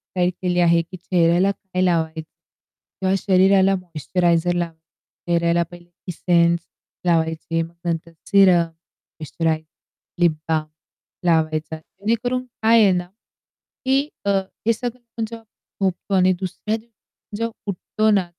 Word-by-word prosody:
काय 180 -1 +3
केली 180 -1 -1
आहे, 170 -1 +4
की 175 +3 -10
चेहऱ्याला 175 +1 +2
काय 185 -2 -4
लावाय 165 -3 +1
किंवा 185 +3 -7
शरीराला 190 0 +4
मॉइश्चरायझर 175 0 0
लावा 170 -1 -2 0.5
चेहऱ्याला 170 0 +2
पहिले 175 0 -13 0.2
इसेन्स 170 -1 +2 0.5
लावायची 165 -1 +1
मग 165 +1 -6
नंतर 170 0 -2 0.2
सिरम, 195 -4 +6
मॉइश्चरायझर, 160 -1 -5 0.5
लिप 175 -2 +5 0.2
बाल्म 155 -1 0 0.6
लावायचा. 160 -1 +1
जेणेकरून 230 +9 -2 0.2
काय 225 +1 +6
आहे 200 - +5
ना, 180 -1 -1 0.8
की 265 +1 +4 0.3
अ, - - +1 0.4
हे 230 - +4
सगळं 235 -1 -6
जेव्हा 230 0 -9 0.4
झोपतो 190 +2 -2
आणि 185 0 +4
दुसऱ्या 195 +3 -3
दिवशी 220 -2 -14
जेव्हा 230 +1 -2 0.2
उठतो 215 +3 -1
ना 190 -4 +2
180 Hz, 125 wpm, -22 LUFS, 170-195 Hz, 0.8 s, सिरम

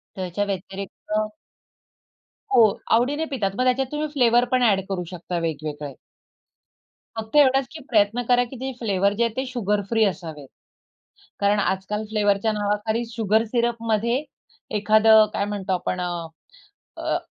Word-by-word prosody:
त्याच्या 185 +2 -2
व्यतिरिक्त 195 +1 -6 1.4
हो, 230 - +7 0.3
आवडीने 285 +7 +1
पितात. 220 -8 -1
मग 255 - +1
त्याच्यात 255 +1 +2
तुम्ही 300 +1 -2
फ्लेवर 245 -3 +4
पण 255 -1 +3
अ‍ॅड 195 - +2
करू 180 -2 -2
शकता 175 0 -4
वेगवेगळे. 150 -3 -4 1.2
फक्त 220 +5 -4
एवढचं 270 -2 +5
की 315 - -9
प्रयत्न 215 +2 +3
करा, 245 0 +4
की 250 +2 -10
जे 265 0 -3
फ्लेवर 200 -3 +1
जे 235 - +3
आहे 230 -1 -2
ते 260 - -1
शुगरफ्री 215 -2 0
असावेत, 160 -8 -4 0.9
कारण 205 +1 +2
आजकाल 200 +2 -1
फ्लेवरच्या 205 0 +2
नावाखाली 210 +3 -1
शुगर 220 0 +1
सिरपमध्ये 235 +2 0 0.5
एखादं 215 +1 +6
काय 200 - 0
म्हणतो 200 -2 -3
आपण 180 0 -2
अ, 175 -2 -3 0.7
अ - - -1
210 Hz, 135 wpm, -23 LUFS, 195-240 Hz, 1.4 s, हो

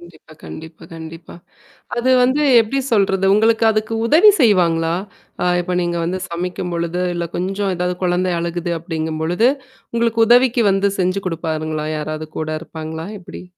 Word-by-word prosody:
கண்டிப்பா, 170 -2 -16
கண்டிப்பா, 160 0 -10
கண்டிப்பா. 165 +1 -10 0.6
அது 245 +2 +1
வந்து 260 +4 +2 0.2
எப்டி 225 +5 -2
சொல்றது. 195 -3 +2
உங்களுக்கு 225 +2 +3
அதுக்கு 215 +1 -2
உதவி 325 - +6
செய்வாங்களா? 170 -7 +3 0.5
அ - - 0 0.2
இப்ப 180 +1 -3
நீங்க 175 0 -1
வந்து 185 +2 -2
சமைக்கும்பொழுது, 175 0 -3
இல்ல 170 -1 -3
கொஞ்சம் 195 +1 -2
ஏதாவது 180 0 -2
குழந்தை 180 0 +1
அழுகுது 170 0 -3
அப்டிங்கும்பொழுது, 160 +6 0 0.5
உங்களுக்கு 230 -1 +1
உதவிக்கு 245 -1 +4
வந்து 195 +1 +2
செஞ்சு 185 +2 0
குடுப்பாருங்களா? 155 -2 -3
யாராவது 155 +1 -5
கூட 155 0 -3
இருப்பாங்களா? 160 0 -7
எப்டி? 180 0 -10
175 Hz, 135 wpm, -19 LUFS, 165-205 Hz, 0.6 s, உதவி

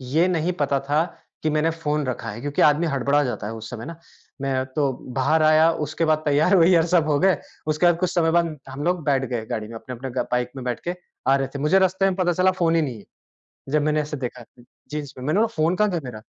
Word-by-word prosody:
ये 170 +3 +4
नहीं 175 0 0
पता 140 -1 +1
था 145 +4 +1 0.4
कि 155 - +2
मैंने 155 +2 +1
फ़ोन 150 -3 -2
रखा 115 -3 -4
है 110 +4 -7
क्योंकि 145 0 -1
आदमी 150 +3 +4
हड़बड़ा 140 +1 +1
जाता 120 -5 -3
है 115 - -5
उस 110 0 -8
समय 115 -1 -7
ना, 165 +1 -8 0.4
मैं 130 -1 -1
तो 140 -3 +2 0.3
बाहर 155 +4 +3
आया। 155 +1 +5 0.2
उसके 155 +3 -2
बाद 155 -1 +3
तैयार-वैयार 165 +3 +4
सब 170 -3 +2
हो 145 -1 +2
गए 190 -1 +3 0.3
उसके 155 +3 +1
बाद 175 -1 +4
कुछ 185 -1 0
समय 165 -2 +2
बाद 170 -2 +1
हम 140 +2 -6
लोग 175 -1 0
बैठ 135 -2 +2
गए 115 -3 -3
गाड़ी 110 -1 -4
में, 115 - -9
अपने-अपने 125 +3 -7
ब - - -5
बाइक 125 0 0
में 130 - -6
बैठ 125 - -2
के 175 - -1 0.3
आ 135 - +5
रहे 135 -1 0
थे। - - -3
मुझे 150 +7 +3
रास्ते 190 +1 +2
में 190 -1 +1
पता 175 -2 +1
चला 185 +2 +3
फ़ोन 165 -1 +3
ही 165 - +3
नहीं 130 -7 -3
है, - - -16 0.6
जब 150 +1 +1
मैंने 155 0 +1
ऐसे 150 0 -4
देखा 125 -2 -5
तो 120 +1 -20 0.3
जीन्स 145 -2 -5
में, 125 - -7
मैंने 155 +7 +1
बोला 230 - +4
फ़ोन 165 +4 +2
कहाँ 210 -1 +2
गया 170 -2 -1
मेरा? 110 -4 -8
150 Hz, 255 wpm, -23 LUFS, 130-165 Hz, 0.6 s, आया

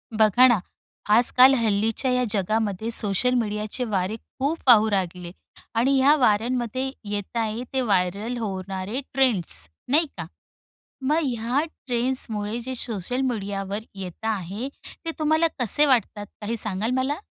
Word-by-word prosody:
बघा 220 +4 +6
ना, 235 -6 +3 0.6
आजकाल 250 +3 +6
हल्लीच्या 225 +2 0
या 250 0 +2
जगामध्ये 215 +1 -1
सोशल 225 +3 +3
मीडियाचे 210 +2 -3
वारे 205 -3 -1 0.2
खूप 295 +5 -1
वाहू 220 -3 +7
लागले 180 -3 -2 0.4
आणि 265 +4 +3
या 275 +3 +5
वाऱ्यांमध्ये 245 +1 0
येत 205 +2 -5
आहे 225 +1 -2
ते 265 - +1
व्हायरल 200 +2 0
होणारे 195 +2 -4
ट्रेंड्स, 220 - +2 0.2
नाही 310 +5 +3
का? 165 - -5 0.8
मग 290 +4 +1
ह्या 240 0 -1 0.3
ट्रेंड्समुळे 235 -3 0
जे 260 +2 -5
सोशल 235 +1 -3
मीडियाव 200 -3 -4 0.2
येत 190 +2 -8
आहे, 210 +2 -3 0.4
ते 330 - -2
तुम्हाला 315 +2 +3
कसे 250 +5 +3
वाटतात? 230 -6 +1 0.2
काही 225 +3 -3
सांगा 210 -1 0
ल - - -1
मला? 280 +5 -1
225 Hz, 135 wpm, -24 LUFS, 205-255 Hz, 0.8 s, वाहू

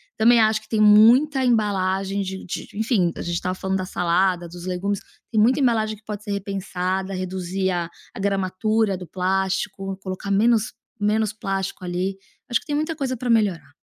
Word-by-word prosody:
também 235 +2 +5
acho 220 0 +3
que 220 - -21
tem 220 - 0
muita 235 +7 +6
embalagem 195 -4 +1
de 190 0 -5
de 180 - -5
enfim, 215 -5 +1
a - - -4
gente 175 - -3
estava 180 +1 -2
falando 190 +1 -1
da 185 - -2
salada, 180 0 +1
dos 175 +1 -10
legumes, 190 +2 -2 0.3
tem 220 -2 +3
muita 250 +6 +4
embalagem 220 -5 +1
que 210 - -25
pode 210 -1 -6
ser 210 - -5
repensada, 190 -1 -2
reduzir 185 0 -2
a 175 -2 -2 0.3
a - - -7
gramatura 200 +2 0
do 180 -1 -8
plástico, 190 +1 -1
colocar 190 +1 -5
menos 220 +2 +3 0.3
menos 210 0 +1
plástico 195 -2 -3
ali. 180 +2 -2 0.3
Acho 240 - +2
que - - -21
tem 295 - -1
muita 310 +2 -1
coisa 265 -4 -2
pra 245 +2 -4
melhorar. 200 -10 +1
195 Hz, 180 wpm, -23 LUFS, 185-220 Hz, 0.3 s, muita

